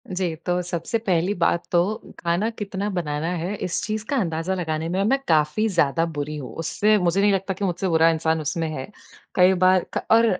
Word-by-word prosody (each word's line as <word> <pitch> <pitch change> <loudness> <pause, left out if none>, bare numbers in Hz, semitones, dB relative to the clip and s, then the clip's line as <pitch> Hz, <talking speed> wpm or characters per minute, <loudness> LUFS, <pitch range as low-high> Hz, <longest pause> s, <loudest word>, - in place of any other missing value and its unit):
जी, 180 -3 -2
तो 175 +2 -1
सबसे 175 +4 -2
पहली 190 -3 0
बात 170 0 +1
तो 175 - +4 0.4
खाना 175 +6 0
कितना 205 -2 -4
बनाना 160 -5 -2
है 175 +5 -3
इस 180 -3 -3
चीज़ 215 0 -3
का 285 - 0
अंदाज़ा 170 -3 -1
लगाने 160 -3 -2
में 185 +2 -1
अम, 200 - +2
मैं 270 +4 +3
काफ़ी 155 +7 +2
ज़्यादा 165 -3 +2
बुरी 150 -2 -4
हूँ। 135 -4 -7
उससे 210 +6 +2
मुझे 180 0 +1
नहीं 205 0 +4
लगता 195 0 -1
कि 195 +2 -3
मुझसे 180 +1 -1
बुरा 165 -1 +4
इंसान 160 0 0
उसमें 160 +2 -2
है। 130 - -5 0.5
कई 185 +1 +6
बार 185 0 +4
ख - - -1
और 230 +1 +6
175 Hz, 210 wpm, -23 LUFS, 160-195 Hz, 0.5 s, कई